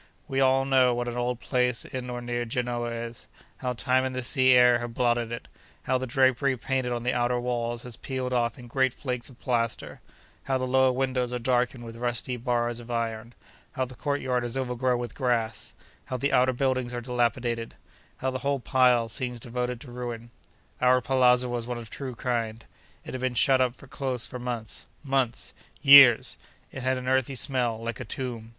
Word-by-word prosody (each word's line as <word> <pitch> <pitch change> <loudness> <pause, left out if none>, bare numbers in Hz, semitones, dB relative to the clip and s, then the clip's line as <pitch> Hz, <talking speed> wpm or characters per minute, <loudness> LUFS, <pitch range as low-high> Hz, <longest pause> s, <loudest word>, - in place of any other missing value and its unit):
We 135 - -1
all 135 0 +4
know 130 -2 +4
what 120 0 -2
an 120 - -3
old 125 0 -1
palace 125 -2 0
in 125 -1 -6
or 120 0 -4
near 120 0 -2
Genoa 120 0 -2
is—how 115 +2 -7
time 130 +2 +1
and 130 -1 -3
the 130 - -2
sea 130 +3 +4
air 125 -1 +6
have 120 -1 -6
blotted 120 -2 +1
it—how 125 +2 -5
the 130 - -4
drapery 130 +1 +2
painted 130 0 -1
on 120 -1 -2
the 125 +1 +1
outer 120 0 +1
walls 120 -1 -2
has 125 -2 -8
peeled 130 -1 -3
off 120 -2 0
in 125 - -11
great 130 +1 +1
flakes 125 -3 -3
of 125 - -17
plaster—how 115 - -3
the 130 - -2
lower 130 0 +4
windows 125 -1 -1
are 125 - -1
darkened 125 0 0
with 115 0 -9
rusty 120 +1 -2
bars 120 0 -1
of 120 0 -12
iron—how 115 +3 -5
the 130 - -11
courtyard 130 -2 -1
is 120 +2 -3
overgrown 125 -1 0
with 120 0 -5
grass—how 120 0 -3
the 140 +3 0
outer 130 0 +4
buildings 130 -1 -1
are 120 - -3
dilapidated—how 120 +1 -3
the 130 - -3
whole 140 0 0
pile 125 -2 +3
seems 125 +2 -4
devoted 125 +1 -3
to 125 0 -11
ruin. 120 -1 -6 0.5
Our 125 0 +5
palazzo 125 -1 +3
was 120 -1 -3
one 125 -1 -3
of 120 - -7
the - - -6
true 130 -3 -5
kind. 115 -2 -2 0.4
It - - -7
had 130 - -4
been 130 -1 -1
shut 130 +2 +4
up 125 -1 +1
close 130 -4 -2
for 125 - -6
months. 120 -3 -4 0.2
Months?—years!—it 135 0 +4
had 130 +1 +1
an 125 0 -6
earthy 130 +1 +1
smell, 120 -1 0
like 115 +2 -5
a - - -4
tomb. 115 -1 -5
125 Hz, 185 wpm, -27 LUFS, 120-130 Hz, 0.5 s, air